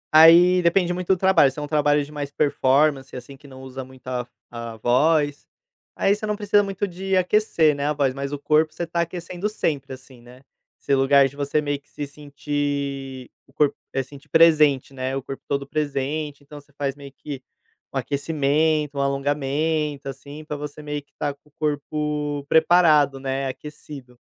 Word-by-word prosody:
Aí, 175 Hz, +3 st, +8 dB
depende 175 Hz, +1 st, +2 dB
muito 180 Hz, 0 st, -5 dB
do 190 Hz, -, +3 dB
trabalho. 190 Hz, -7 st, +4 dB
Se 135 Hz, -, -18 dB
é 150 Hz, -, -4 dB
um 145 Hz, -, -4 dB
trabalho 145 Hz, -1 st, +2 dB
de 150 Hz, -, -14 dB
mais 145 Hz, -1 st, -5 dB
performance, 140 Hz, -1 st, +1 dB
assim, 125 Hz, +2 st, -9 dB
que 140 Hz, +1 st, -17 dB
não 130 Hz, -1 st, -12 dB
usa 130 Hz, 0 st, -7 dB
muito 130 Hz, 0 st, -16 dB
a 125 Hz, -1 st, -3 dB, 0.3 s
a 115 Hz, -1 st, -6 dB
voz, 145 Hz, +5 st, +2 dB, 0.5 s
aí 195 Hz, -, +3 dB
você 215 Hz, +1 st, -5 dB
não 210 Hz, -, 0 dB
precisa 205 Hz, 0 st, +3 dB
muito 195 Hz, 0 st, -3 dB
de 190 Hz, +1 st, -2 dB
aquecer, 180 Hz, -4 st, +3 dB
né, 140 Hz, 0 st, -2 dB
a 150 Hz, -, +1 dB
voz, 140 Hz, -3 st, +1 dB
mas 140 Hz, +1 st, -5 dB
o 145 Hz, -, -3 dB
corpo 155 Hz, +2 st, +2 dB
você 170 Hz, -, -4 dB
tá 170 Hz, +1 st, -1 dB
aquecendo 175 Hz, +3 st, -4 dB
sempre, 145 Hz, -9 st, -2 dB
assim, 130 Hz, -1 st, -14 dB
né. 125 Hz, +2 st, -16 dB, 0.4 s
Esse 140 Hz, -, -1 dB
lugar 135 Hz, 0 st, +5 dB
de 135 Hz, -, -13 dB
você 145 Hz, +1 st, 0 dB
meio 145 Hz, -1 st, -2 dB
que 145 Hz, -, -34 dB
se 145 Hz, -, -5 dB
sentir 140 Hz, -2 st, -4 dB, 0.2 s
o 135 Hz, -, -25 dB
corpo 150 Hz, -1 st, +2 dB, 0.2 s
eh, 135 Hz, -, -1 dB
sentir 140 Hz, +2 st, -15 dB
presente, 150 Hz, -4 st, +4 dB
né, 130 Hz, 0 st, -3 dB
o 135 Hz, -, -3 dB
corpo 135 Hz, 0 st, -7 dB
todo 140 Hz, -1 st, -1 dB
presente. 145 Hz, 0 st, -3 dB
Então 145 Hz, +1 st, -11 dB
você 145 Hz, -, -28 dB
faz 140 Hz, -1 st, -2 dB
meio 140 Hz, -1 st, -11 dB
que 140 Hz, -2 st, -8 dB, 0.5 s
um -, -, -4 dB
aquecimento, 150 Hz, 0 st, 0 dB
um -, -, +2 dB
alongamento, 145 Hz, +2 st, -1 dB
assim, 145 Hz, +3 st, -9 dB
para 150 Hz, -, -5 dB
você 150 Hz, +1 st, -8 dB
meio 150 Hz, 0 st, -4 dB
que 145 Hz, 0 st, -38 dB
estar 145 Hz, 0 st, -3 dB
com 145 Hz, +1 st, -28 dB
o -, -, -36 dB
corpo 150 Hz, -1 st, -2 dB
preparado, 155 Hz, -4 st, +4 dB
né, 135 Hz, 0 st, -2 dB
aquecido. 135 Hz, -2 st, -10 dB
145 Hz, 190 wpm, -23 LUFS, 135-155 Hz, 0.5 s, Aí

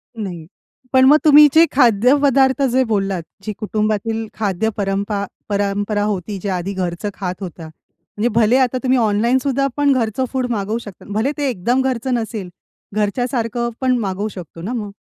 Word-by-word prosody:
नाही. 180 Hz, -7 st, -6 dB, 0.5 s
पण 260 Hz, 0 st, +6 dB
मग 295 Hz, +3 st, +7 dB
तुम्ही 300 Hz, 0 st, +9 dB
जे 325 Hz, +1 st, +7 dB
खाद्यपदार्थ 265 Hz, +3 st, +4 dB
जे 260 Hz, +1 st, +3 dB
बोललात, 195 Hz, -4 st, 0 dB, 0.2 s
जी 215 Hz, -, -3 dB
कुटुंबातील 215 Hz, +1 st, -1 dB
खाद्य 215 Hz, 0 st, -1 dB
परंपा 200 Hz, 0 st, -1 dB, 0.2 s
परंपरा 205 Hz, +1 st, -1 dB
होती, 205 Hz, -1 st, -3 dB
जे 200 Hz, -, -2 dB
आधी 185 Hz, +2 st, -2 dB
घरचं 185 Hz, +2 st, -3 dB
खात 185 Hz, -2 st, -4 dB
होता, 175 Hz, -3 st, -7 dB
म्हणजे 170 Hz, +7 st, -6 dB
भले 230 Hz, +3 st, +4 dB
आता 255 Hz, -1 st, +2 dB
तुम्ही 260 Hz, 0 st, +3 dB
ऑनलाईनसुद्धा 250 Hz, +6 st, +1 dB
पण 290 Hz, -1 st, +3 dB
घरचं 240 Hz, +1 st, 0 dB
फूड 260 Hz, -2 st, -1 dB
मागवू 210 Hz, 0 st, -1 dB
शकता. 205 Hz, -6 st, -10 dB
भले 225 Hz, +7 st, 0 dB
ते 285 Hz, -2 st, 0 dB
एकदम 240 Hz, +5 st, 0 dB
घरचं 260 Hz, -1 st, -1 dB
नसेल, 220 Hz, -5 st, -3 dB, 0.5 s
घरच्यासारखं 235 Hz, +2 st, -1 dB
पण 255 Hz, -1 st, +2 dB
मागवू 200 Hz, -1 st, -2 dB
शकतो 170 Hz, -2 st, -10 dB
ना 220 Hz, +8 st, -4 dB
मग? 210 Hz, -4 st, -4 dB
220 Hz, 160 wpm, -19 LUFS, 200-255 Hz, 0.5 s, तुम्ही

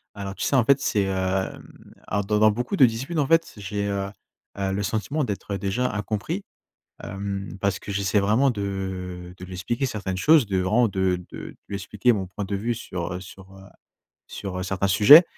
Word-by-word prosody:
Alors, 100 Hz, -1 st, -5 dB
tu -, -, -4 dB
sais, 140 Hz, -, +1 dB
en 120 Hz, -4 st, +4 dB
fait, 140 Hz, +1 st, +5 dB
c'est, 105 Hz, -7 st, +1 dB
hem 95 Hz, 0 st, -3 dB
alors 100 Hz, 0 st, -1 dB
dans 105 Hz, 0 st, +1 dB
dans 110 Hz, 0 st, +6 dB
beaucoup 125 Hz, -, -2 dB
de 135 Hz, -, +7 dB
disputes, 135 Hz, +8 st, -1 dB
en 140 Hz, -, +2 dB
fait, 165 Hz, 0 st, +3 dB
j'ai, 100 Hz, +1 st, -3 dB
heu, 100 Hz, -1 st, -2 dB, 0.5 s
heu, 95 Hz, -1 st, -1 dB
le 100 Hz, -, -1 dB
sentiment 140 Hz, +9 st, -1 dB
d'être 100 Hz, -2 st, -3 dB
déjà 115 Hz, +7 st, 0 dB
incompris, 110 Hz, -, -2 dB, 0.6 s
hem, 100 Hz, 0 st, -4 dB
parce 100 Hz, 0 st, +1 dB
que 100 Hz, -, -7 dB
j'essaie 100 Hz, +1 st, +2 dB
vraiment 110 Hz, +8 st, +3 dB
de 95 Hz, -4 st, -4 dB
de 90 Hz, -, -8 dB
lui 95 Hz, -, -10 dB
expliquer 120 Hz, +9 st, -1 dB
certaines 100 Hz, -6 st, -3 dB
choses, 150 Hz, -, +5 dB
de 95 Hz, -2 st, 0 dB
vraiment 110 Hz, +6 st, +3 dB
de 95 Hz, -2 st, +1 dB
de -, -, -7 dB
de -, -, -13 dB
lui 100 Hz, -, -4 dB
expliquer 105 Hz, +5 st, +1 dB
mon 100 Hz, -4 st, -1 dB
point 95 Hz, +3 st, -6 dB
de 100 Hz, +1 st, -2 dB
vue 115 Hz, +4 st, -1 dB
sur, 90 Hz, -5 st, -5 dB
heu, 90 Hz, -, -4 dB
sur, 95 Hz, 0 st, -12 dB
heu, 95 Hz, 0 st, -13 dB, 0.6 s
sur, 95 Hz, -2 st, -5 dB
heu, -, -, -2 dB
certains 95 Hz, +1 st, 0 dB
sujets 115 Hz, -, +10 dB
100 Hz, 205 wpm, -25 LUFS, 95-115 Hz, 0.6 s, sujets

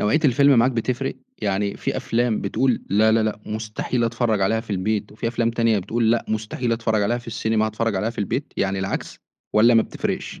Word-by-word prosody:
نوعية 105 Hz, +10 st, +2 dB
الفيلم 140 Hz, +1 st, +5 dB
معاك 120 Hz, +3 st, +4 dB
بتفرِق؟ 125 Hz, +3 st, -2 dB, 0.3 s
يعني 100 Hz, 0 st, -1 dB
في -, -, -3 dB
أفلام 120 Hz, -1 st, 0 dB
بتقول 125 Hz, +5 st, 0 dB
لا، 110 Hz, +3 st, +4 dB
لا، 115 Hz, 0 st, +3 dB
لأ، 110 Hz, -1 st, -2 dB
مستحيل 110 Hz, +3 st, -2 dB
أتفرّج 115 Hz, -2 st, 0 dB
عليها 110 Hz, +4 st, +2 dB
في 115 Hz, -, -13 dB
البيت، 105 Hz, +2 st, -1 dB
وفي 115 Hz, +2 st, -3 dB
أفلام 115 Hz, 0 st, 0 dB
تانية 115 Hz, -2 st, +2 dB
بتقول 110 Hz, +4 st, 0 dB
لأ 115 Hz, -, +1 dB
مستحيل 115 Hz, +4 st, -2 dB
أتفرّج 110 Hz, -2 st, 0 dB
عليها 120 Hz, +4 st, +1 dB
في 120 Hz, -, -14 dB
السينما 110 Hz, -1 st, 0 dB
هاتفرّج 110 Hz, -1 st, -1 dB
عليها 110 Hz, +4 st, 0 dB
في -, -, -14 dB
البيت، 100 Hz, -, -2 dB
يعني 95 Hz, 0 st, 0 dB
العكس، 95 Hz, 0 st, -4 dB, 0.3 s
والّا 115 Hz, +3 st, +5 dB
ما 115 Hz, -, +6 dB
بتفرقش؟ -, -, -4 dB
110 Hz, 200 wpm, -22 LUFS, 105-120 Hz, 0.3 s, ما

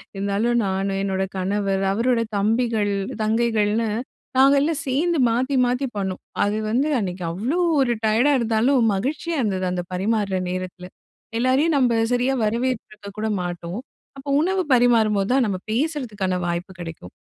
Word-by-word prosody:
இருந்தாலும் 200 Hz, +4 st, 0 dB
நானு, 195 Hz, +1 st, -1 dB
என்னோட 190 Hz, -1 st, -1 dB
கணவர், 195 Hz, 0 st, 0 dB
அவரோட 235 Hz, +2 st, +1 dB, 0.2 s
தம்பிகள், 220 Hz, 0 st, +1 dB, 0.3 s
தங்கைகள்னு 220 Hz, 0 st, +1 dB, 0.5 s
நாங்க 275 Hz, +2 st, +6 dB
எல்லாம் 310 Hz, +1 st, 0 dB
சேர்ந்து 320 Hz, +5 st, +1 dB
மாத்தி 255 Hz, +4 st, 0 dB
மாத்தி 250 Hz, +3 st, 0 dB
பண்ணோம். 190 Hz, -2 st, -3 dB, 0.2 s
அது 205 Hz, +1 st, 0 dB
வந்து 260 Hz, +7 st, +1 dB
அன்னைக்கு 185 Hz, -2 st, -4 dB
அவ்வளோ 230 Hz, -, -2 dB, 0.2 s
ஒரு 255 Hz, -3 st, +2 dB
டயடா 225 Hz, +7 st, +3 dB
இருந்தாலும், 235 Hz, +3 st, +2 dB
மகிழ்ச்சியா 300 Hz, +10 st, -2 dB
இருந்தது. 190 Hz, -5 st, -1 dB
அந்த 180 Hz, -1 st, -2 dB
பரிமாறுற 200 Hz, 0 st, 0 dB
நேரத்தில 180 Hz, 0 st, -5 dB, 0.5 s
எல்லாரையும் 265 Hz, +6 st, +2 dB
நம்ப 250 Hz, -3 st, +3 dB, 0.2 s
சரியா 250 Hz, +2 st, +1 dB
வரவேற்றுக்க 225 Hz, -2 st, -3 dB
கூட 220 Hz, +1 st, -1 dB
மாட்டோம். 175 Hz, +2 st, -5 dB, 0.4 s
அப்போ 270 Hz, +1 st, -8 dB
உணவு 375 Hz, +3 st, +1 dB
பரிமாறும்போது 225 Hz, -4 st, +3 dB
தான் 265 Hz, -2 st, +3 dB
நம்ம 195 Hz, -2 st, -1 dB
பேசறதுக்கான 220 Hz, -, -1 dB
வாய்ப்பு 175 Hz, +2 st, -3 dB
கிடைக்கும். 165 Hz, -, -8 dB
220 Hz, 135 wpm, -22 LUFS, 195-255 Hz, 0.5 s, நாங்க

